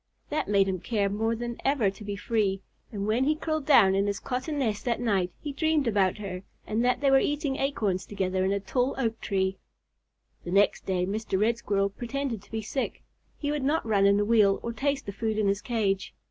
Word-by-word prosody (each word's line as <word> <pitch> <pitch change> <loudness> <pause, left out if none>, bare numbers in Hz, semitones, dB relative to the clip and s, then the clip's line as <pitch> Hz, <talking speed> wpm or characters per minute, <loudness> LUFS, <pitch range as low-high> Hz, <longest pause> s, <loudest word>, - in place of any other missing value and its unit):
That 305 - -1
made 200 -1 +3
him 185 -1 -1
care 205 0 0
more 225 +3 0
than 240 +1 -5
ever 265 -8 +2
to 200 - -12
be 205 -1 -4
free, 200 -2 0 0.3
and 200 -3 -3
when 225 +5 +2
he 305 +2 +2
curled 310 -2 -3
down 205 -10 +6
in 195 +1 +1
his 200 -1 -1
cotton 265 +4 -3
nest 220 -7 -1
that 235 -2 0
night 195 -7 +1
he 290 -2 -5
dreamed 315 -1 +1
about 200 -4 +2
her, 190 -3 -5 0.2
and 220 +2 0
that 250 +1 +2
they 275 -1 +3
were 270 - +7
eating 290 -2 -1
acorns 215 -9 -1
together 185 -2 -1
in 190 - +1
a 200 - +1
tall 250 +7 -1
oak 230 -4 -1
tree. 190 -1 -1 0.8
The - - -7
next 200 +2 +2
day 180 -2 +1
Mr. 200 0 -2
Red 230 +3 +2
Squirrel 200 -2 0
pretended 245 0 -4
to 205 - -21
be 220 -1 -3
sick. 265 +5 -3 0.3
He 290 -1 -2
would 295 -2 -2
not 295 +2 +1
run 200 -3 +3
in 200 0 +4
the 205 - +1
wheel 210 -3 +4
or 235 - -3
taste 275 +2 -1
the 200 - -4
food 220 +2 -2
in 215 -2 +2
his 200 +1 +1
cage. 200 -5 -1
220 Hz, 225 wpm, -27 LUFS, 195-260 Hz, 0.8 s, were